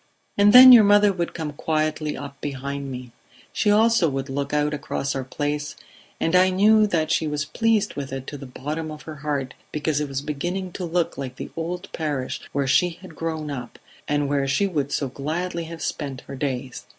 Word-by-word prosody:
"And 205 0 +5
then 255 +2 +11
your 235 -3 +10
mother 205 0 +5
would 175 -2 -3
come 155 -3 -4
quietly 155 0 -1
up 140 0 -9
behind 140 0 -4
me. 125 -1 -7 0.4
She 210 - +1
also 220 -4 +4
would 135 0 -4
look 140 +1 -3
out 150 0 +1
across 140 -1 -3
our 135 - -3
place, 145 +2 -3 0.4
and 165 - +1
I 185 +1 +6
knew 210 +3 +5
that 160 -5 0
she 160 - +1
was 150 0 -2
pleased 215 +6 +1
with 140 -2 -6
it 135 -1 -5
to 145 - -7
the 135 - -8
bottom 150 +5 -5
of 155 0 -9
her 155 -1 -8
heart 140 -2 -3 0.2
because 150 0 -1
it 150 - -3
was 135 0 -3
beginning 175 +6 -3
to 180 - -5
look 170 -3 -1
like 130 -2 -5
the - - -7
old 175 +3 -4
parish 145 -5 -3
where 140 -1 0
she 175 +6 +3
had 175 +1 -12
grown 160 -2 -3
up, 125 -4 -7 0.3
and 145 -1 +1
where 140 -1 0
she 135 +9 +2
would 150 -7 -2
so 140 - -1
gladly 165 +6 -3
have 165 0 -8
spent 140 -4 -4
her 140 - -9
days. 130 -2 -4
150 Hz, 205 wpm, -23 LUFS, 140-175 Hz, 0.4 s, then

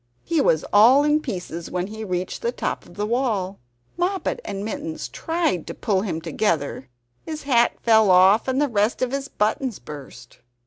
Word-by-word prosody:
He 330 -3 +1
was 160 - +2
all 240 +7 +7
in 300 +1 +3
pieces 180 - -6
when 180 0 -2
he 220 +2 -7
reached 185 -2 -3
the 475 - 0
top - - -4
of - - -16
the 210 - -2
wall. 215 -5 -1 0.4
Moppet 370 +5 -1
and 195 +1 -5
Mittens 165 -7 -5
tried 325 - -2
to - - -6
pull 200 -5 0
him 175 -6 -3
together; 155 - -1 0.3
his 310 -1 -7
hat 240 -4 +3
fell 220 -3 +5
off, 190 +5 +5
and 260 +1 +1
the 295 - +3
rest 215 +1 0
of 250 - -1
his 275 0 -3
buttons 230 0 -1
burst. 130 -5 -11
215 Hz, 180 wpm, -23 LUFS, 185-270 Hz, 0.4 s, all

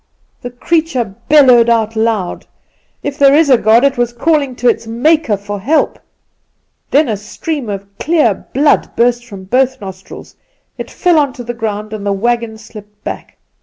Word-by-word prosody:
The 245 - -6
creature 255 - -1 0.2
bellowed 255 -6 +6
aloud. 220 -4 -1 0.6
If 285 +1 -5
there 280 0 +6
is 300 -2 +3
a 255 - +6
God, 225 +3 +4
it 275 -3 +1
was 240 -1 0
calling 280 0 0
to 245 - -1
its 230 -1 +1
Maker 265 0 +1
for 205 +1 -6
help. 285 +11 0 0.9
Then 290 +1 +3
a 220 - -1
stream 235 +6 -5
of 200 -1 -5
clear 305 -8 +2 0.2
blood 285 +3 +1
burst 240 0 +1
from 200 -4 -10
both 260 +6 0
nostrils; 190 -2 -11 0.4
it - - -7
fell 350 -3 +2
on 285 -3 0
to 250 -3 -9
the 240 0 -5
ground, 215 -2 -5
and 210 -2 -6
the 200 -1 0
wagon 230 +2 -2
slipped 210 -1 -14
back. - - -7
240 Hz, 165 wpm, -14 LUFS, 215-280 Hz, 0.9 s, bellowed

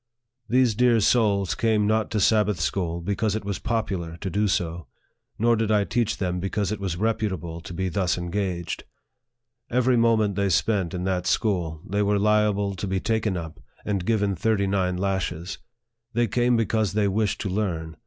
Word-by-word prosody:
These 125 -1 +3
dear 120 +1 +4
souls 100 -4 +2
came 110 -2 +1
not 110 +1 +1
to 110 - -1
Sabbath 105 -2 +3
school 85 +1 -1
because 100 +3 -1
it 110 - -4
was 100 -2 -3
popular 95 -8 -2
to 95 - -3
do 105 +4 +1
so, 85 -2 -2 0.5
nor 115 +2 +3
did 110 -1 -1
I 105 -1 +3
teach 115 0 0
them 90 -2 -2
because 95 +1 -1
it 105 - -3
was 95 -4 -3
reputable 95 -6 -2
to 85 - -9
be 95 +2 -2
thus 90 +1 0
engaged. 85 -1 -3 0.9
Every 125 0 +2
moment 115 -3 +3
they 100 0 0
spent 95 0 +1
in 90 - -3
that 90 -1 -1
school, 85 -7 0
they 100 +3 0
were 105 0 +2
liable 105 -1 +2
to 100 - -3
be 95 0 0
taken 110 -2 0
up, 80 -4 -7 0.3
and 100 -4 -1
given 100 -1 +1
thirty 100 +2 +1
nine 95 -2 0
lashes. 90 -2 -2 0.5
They 120 +1 +2
came 120 +2 +2
because 110 -3 0
they 105 -1 +2
wished 105 +1 0
to 100 - -2
learn. 85 -5 -2
100 Hz, 180 wpm, -25 LUFS, 90-110 Hz, 0.9 s, dear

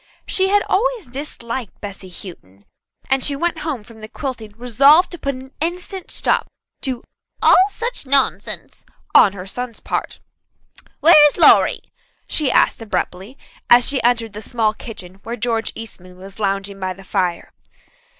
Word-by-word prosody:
She 380 0 +1
had 410 +1 +3
always 475 0 0
disliked 245 -4 -6
Bessy 195 -2 -8
Houghton, 100 - -12 0.4
and 265 -1 +1
she 285 - +1
went 340 +3 -1
home 295 -9 -4
from 225 0 -15
the 215 - -9
quilting 235 -4 -6
resolved 275 - +5
to 350 - -8
put 275 -1 -2
an 260 +1 -12
instant 360 +3 -4
stop - - 0 0.3
to 255 -3 -3 0.4
"all 380 +2 +6
such 460 - -4
nonsense" 275 0 0 0.3
on 195 - +7
her 185 -2 -8
son's 240 +3 -6
part. - - -4 0.8
"Where 310 -1 +8
is 290 - -2
Lawrie?" - - +5 0.4
she 300 -4 +1
asked - - +3
abruptly; 205 +2 -4 0.3
as 240 0 +7
she 275 -2 +2
entered 230 -3 +1
the 210 - -7
small 220 -1 0
kitchen 195 -5 -9
where 230 +3 -5
George 230 -1 -1
Eastman 185 -5 -7
was 195 +2 -13
lounging 195 -1 -2
by 185 -1 -3
the 195 +1 -14
fire. 180 -2 -2
240 Hz, 155 wpm, -19 LUFS, 200-285 Hz, 0.8 s, Where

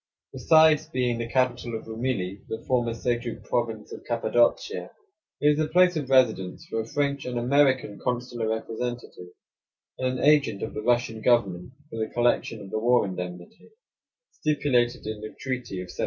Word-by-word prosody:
Besides 155 -1 +5
being 125 -5 -1
the 115 0 -4
capital 125 -2 0
of - - -11
Rumili, 110 -5 -3
the 110 0 -6
former 120 -2 +1
Seljuk 120 0 -3
province 115 -3 -2
of - - -9
Cappadocia, 120 - +1 0.5
it 145 - +2
is 150 0 +2
the 155 - +1
place 180 +2 +4
of 145 -4 -3
residence 110 -9 +2
for 115 - -2
a 110 - -8
French 140 0 -1
and 125 -1 -4
American 130 -3 +2
consular 120 -2 -2
representative, 115 -3 -4 0.7
and 130 0 -1
an - - -1
agent 145 -9 +3
of - - -4
the - - -4
Russian 120 -1 0
government 110 -3 +1 0.2
for 115 - -5
the 110 - -2
collection 120 -2 +1
of 95 -1 -10
the 110 - -1
war 120 +1 +3
indemnity, 90 -2 -7 0.6
stipulated 145 -5 0
in 110 -1 -5
the 110 - -8
treaty 125 -7 -4
of 90 - -10
'78. - - -15
120 Hz, 170 wpm, -26 LUFS, 110-130 Hz, 0.7 s, Besides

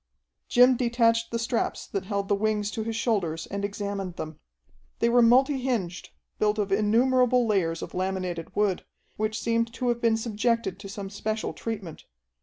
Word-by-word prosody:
Jim 250 +1 +6
detached 230 -1 +2
the 230 - -2
straps 230 +1 -1
that 195 -2 -4
held 200 -1 -2
the 205 - +2
wings 210 0 0
to 220 - -3
his 225 0 -3
shoulders 180 -9 -1
and 200 0 -3
examined 200 -2 -3
them. 155 -2 -7 0.6
They 235 - +2
were 245 +1 +5
multi 260 +4 +5
hinged, 220 -9 -2 0.3
built 210 0 +2
of 205 -2 -1
innumerable 245 +4 +3
layers 175 -6 0
of - - -8
laminated 185 -2 -3
wood, 205 -3 +1 0.3
which 215 +1 -1
seemed 230 0 0
to 250 0 -1
have 235 0 0
been 230 -1 +3
subjected 225 -3 -1
to 200 -1 -9
some 195 -1 -6
special 215 +2 -3
treatment. 205 -8 -6
215 Hz, 170 wpm, -26 LUFS, 195-235 Hz, 0.6 s, Jim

